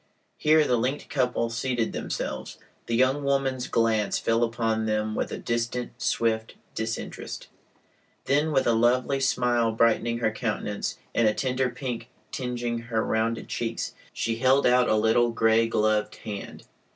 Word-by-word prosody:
Here 155 0 +5
the 125 -3 +2
linked 130 +5 -2
couple 125 -3 0
seated 120 -1 -1
themselves. - - -4 0.3
The 115 - 0
young 130 +4 +2
woman's 135 -2 0
glance 110 -2 +1
fell 115 +1 +1
upon 115 -1 0
them 110 0 0
with - - -2
a - - -3
distant, 120 +1 -3
swift 110 -1 0 0.2
disinterest; 110 0 -5 0.8
then 150 +3 +2
with 135 -3 +2
a 120 - +3
lovely 125 +4 +2
smile 120 -3 +2
brightening 115 +1 +2
her 115 -2 +1
countenance 105 -2 -3 0.2
and 115 - +3
a 105 - +2
tender 130 -1 0
pink 125 -1 -5 0.2
tingeing 120 -2 -3
her 115 -1 -1
rounded 115 +1 -1
cheeks, 115 -1 -3 0.2
she 115 0 -2
held 130 +3 +3
out 125 0 +4
a - - +4
little 110 +2 +3
gray 115 0 +3
gloved 110 -1 +1
hand. 105 -2 -7
115 Hz, 150 wpm, -26 LUFS, 110-125 Hz, 0.8 s, Here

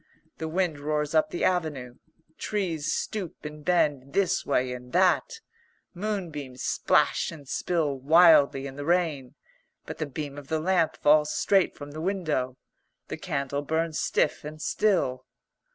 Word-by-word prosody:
The 160 - -3
wind 165 -2 -1
roars 150 0 -2
up 155 -1 +3
the 175 - -4
avenue. 155 -9 -1 0.4
Trees 175 -8 -2
stoop 195 -8 -4
and 150 0 -8
bend 145 -5 +1
this 190 -2 +1
way 125 0 0
and 125 0 -10
that. 190 - +2 0.5
Moonbeams 170 - -4
splash - - +2
and 150 -5 -11
spill 150 -3 -1
wildly 150 -2 +5
in 135 0 -8
the 145 - -5
rain. 160 -6 0 0.5
But - - -8
the 155 - -2
beam 145 0 -6
of 140 - -13
the 160 +1 -1
lamp 175 -1 +1
falls 150 0 +4
straight 195 -2 +2
from 145 0 -9
the 155 +2 -7
window. 155 -9 -1 0.5
The - - -4
candle 140 0 -2
burns 160 +2 -1
stiff 150 - 0
and 155 +1 -8
still. 155 -10 0
155 Hz, 150 wpm, -27 LUFS, 140-175 Hz, 0.5 s, wildly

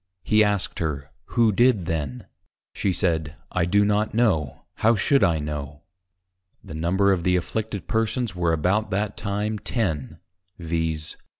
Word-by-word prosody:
He 110 0 +4
asked 105 -2 -1
her, 70 -3 -3
who 115 +1 +2
did 115 -3 +3
then? 75 -7 -3 0.5
She 100 - 0
said, 80 -5 0 0.2
I 90 -2 +1
do 100 +4 +3
not 105 +1 +1
know; 95 - +1
How 115 +2 +4
should 135 +4 +3
I 85 -5 +3
know? 75 -1 -5 0.8
The - - -9
Number 90 +5 +2
of 90 -3 -2
the 90 0 +3
Afflicted 105 +3 -3
Persons 110 -1 -1
were 85 -1 +1
about 90 +7 +1
that 100 +2 -1
time 105 +1 -2
Ten, 80 - -2 0.4
_viz. 80 -2 -3
95 Hz, 145 wpm, -24 LUFS, 80-105 Hz, 0.8 s, He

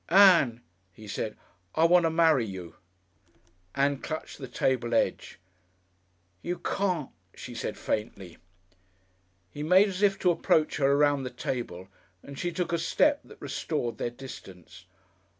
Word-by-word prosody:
"Ann," 170 - +6 0.3
he 105 +4 -13
said. 105 +1 -4 0.4
"I 160 - +3
want 175 0 +5
to - - +3
marry 160 -5 +3
you." 95 -5 -7 1.0
Ann 140 0 +1
clutched 155 +2 -6
the 135 - -6
table 120 -2 0
edge. - - -1 1.0
"You 175 0 -3
can't," 180 -8 -2 0.2
she - - -9
said - - -4
faintly. 100 -5 -4 1.1
He 145 - -7
made 185 +6 +5
as 190 0 -5
if 195 -1 +3
to 180 - +3
approach 160 -2 +1
her 140 -1 +3
around 145 0 +3
the 130 - -4
table, 95 -9 -5 0.4
and 140 -1 -10
she 175 - -2
took 175 -1 -2
a 170 - +1
step 290 - +2
that - - -15
restored 120 -9 -3
their - - -1
distance. 120 -8 -12
145 Hz, 145 wpm, -28 LUFS, 120-175 Hz, 1.1 s, Ann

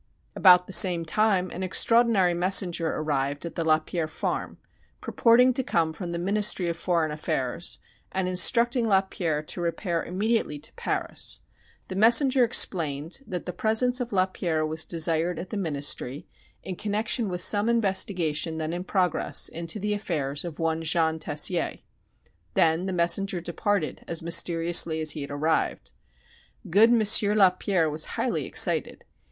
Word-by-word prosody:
About 180 -2 +5
the 195 - -8
same 175 -4 +6
time 190 0 0
an 180 - -7
extraordinary 200 -1 +2
messenger 175 -1 +1
arrived 145 -1 -3
at 170 - -7
the 165 - -4
Lapierre 160 +1 -1
farm, 155 - -5 0.4
purporting 250 +2 +2
to 265 - +2
come 165 -9 -1
from 175 +1 -7
the 170 - -4
Ministry 195 0 +1
of 170 - -3
Foreign 165 -2 -1
Affairs, 150 +1 -2 0.3
and 190 -1 -3
instructing 235 +6 +2
Lapierre 190 -6 -1
to 175 - -5
repair 170 0 -3
immediately 205 -3 -2
to 145 - -8
Paris. - - -3 0.5
The - - -7
messenger 245 +5 +4
explained 165 - +1
that 180 -3 -6
the 180 - -6
presence 235 +6 +1
of 245 - -5
Lapierre 185 -4 -1
was 155 0 -2
desired 165 +1 0
at 175 +3 -8
the - - -5
Ministry 145 -5 -2 0.4
in 185 -2 -7
connection 215 +1 -2
with 180 -1 -2
some 205 +4 +3
investigation 185 -8 -1
then 160 +1 -4
in 175 +1 -5
progress 185 -3 0
into 170 +5 -3
the 210 +1 -2
affairs 150 -8 -3
of 170 -4 -8
one 165 0 -2
Jean 160 0 0
Tessier. 155 +3 0 0.8
Then 165 +3 +1
the - - -3
messenger 180 +2 +1
departed 175 +1 -3
as 165 -1 -4
mysteriously 170 -1 +2
as 155 -1 +3
he 150 - -6
had 140 - -7
arrived. 150 +3 -2 0.8
Good 215 +6 +5
M. 235 -2 +2 0.3
Lapierre 185 -3 +2
was 155 +1 0
highly - - -2
excited. - - +2
175 Hz, 150 wpm, -25 LUFS, 160-200 Hz, 0.8 s, same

